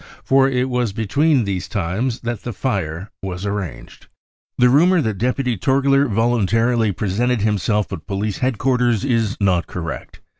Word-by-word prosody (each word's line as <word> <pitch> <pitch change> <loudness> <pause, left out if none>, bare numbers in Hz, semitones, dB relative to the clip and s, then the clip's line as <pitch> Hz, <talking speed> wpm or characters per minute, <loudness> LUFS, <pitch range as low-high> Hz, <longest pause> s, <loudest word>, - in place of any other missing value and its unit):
For 135 0 +4
it 125 -1 0
was 125 -5 -1
between 140 +6 +2
these 95 -3 -3
times 105 +6 -2
that 120 -3 -4
the 120 - -5
fire 95 - -3
was 95 0 -5
arranged. 95 -13 -5 0.3
" - - -71
The 125 - +5
rumour 170 +8 +4
that 110 - -1
deputy 125 0 0
Torgler 135 +5 +2
voluntarily 115 +1 +2
presented 110 +5 -1
himself 105 0 0
at 85 - -8
police 100 0 -2
headquarters 125 -1 +1
is 115 -5 0
not 95 -4 +1
correct. 85 -3 -6
115 Hz, 150 wpm, -20 LUFS, 100-125 Hz, 0.3 s, The